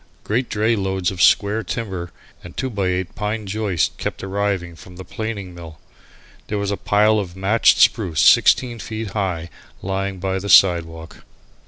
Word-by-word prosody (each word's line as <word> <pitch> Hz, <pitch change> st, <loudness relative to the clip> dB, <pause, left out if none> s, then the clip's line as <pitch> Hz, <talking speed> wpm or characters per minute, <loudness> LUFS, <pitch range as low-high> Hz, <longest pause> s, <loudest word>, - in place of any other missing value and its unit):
Great 120 Hz, +4 st, -1 dB
dray 110 Hz, +2 st, +1 dB
loads 95 Hz, -3 st, -1 dB
of 90 Hz, -2 st, -5 dB
square 105 Hz, +4 st, +3 dB
timber, 95 Hz, -4 st, -5 dB, 0.3 s
and 90 Hz, -, -12 dB
two 130 Hz, -1 st, -2 dB
by 100 Hz, -4 st, -1 dB
eight 90 Hz, 0 st, -2 dB
pine 105 Hz, +1 st, -3 dB
joists 100 Hz, -4 st, -1 dB
kept -, -, -4 dB
arriving 95 Hz, -3 st, -2 dB
from 90 Hz, +2 st, -14 dB
the 95 Hz, -, -9 dB
planing 105 Hz, -3 st, -6 dB
mill. 80 Hz, -3 st, -11 dB, 0.7 s
There 105 Hz, -, -3 dB
was 100 Hz, 0 st, -2 dB
a -, -, 0 dB
pile 105 Hz, +2 st, +2 dB
of 90 Hz, -3 st, -6 dB
matched 100 Hz, +4 st, +3 dB
spruce 90 Hz, -10 st, +2 dB
sixteen 120 Hz, -, +4 dB
feet 110 Hz, +1 st, -6 dB
high 90 Hz, -5 st, -3 dB, 0.3 s
lying 95 Hz, 0 st, -3 dB
by 95 Hz, +1 st, -2 dB
the 100 Hz, +2 st, -6 dB
sidewalk. 80 Hz, -4 st, +3 dB
95 Hz, 165 wpm, -20 LUFS, 90-105 Hz, 0.7 s, sixteen